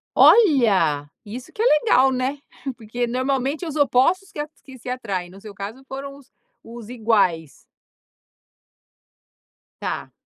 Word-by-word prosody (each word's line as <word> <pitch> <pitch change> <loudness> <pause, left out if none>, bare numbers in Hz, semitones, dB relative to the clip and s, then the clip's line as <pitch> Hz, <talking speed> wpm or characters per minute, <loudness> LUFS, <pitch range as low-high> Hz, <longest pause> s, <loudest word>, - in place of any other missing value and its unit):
Olha 205 - +5 0.2
isso 240 +5 -9
que 430 - -3
é - - +2
legal, 270 - +4
né. 260 +2 -2 0.4
Porque 240 +1 -3
normalmente 265 +5 -1
os 310 -2 -5
opostos 305 +7 +2
que 410 - -12
a 295 - -3 0.2
que 260 -1 -12
se 245 - -10
atraem 200 -8 -3
no 195 +2 -14
seu 210 0 -11
caso, 205 +6 -7
foram 275 +1 -7
os 275 -1 -19 0.3
os 230 -1 -10
iguais. 205 - +1 2.3
Tá. - - -4
250 Hz, 135 wpm, -22 LUFS, 210-275 Hz, 2.3 s, Olha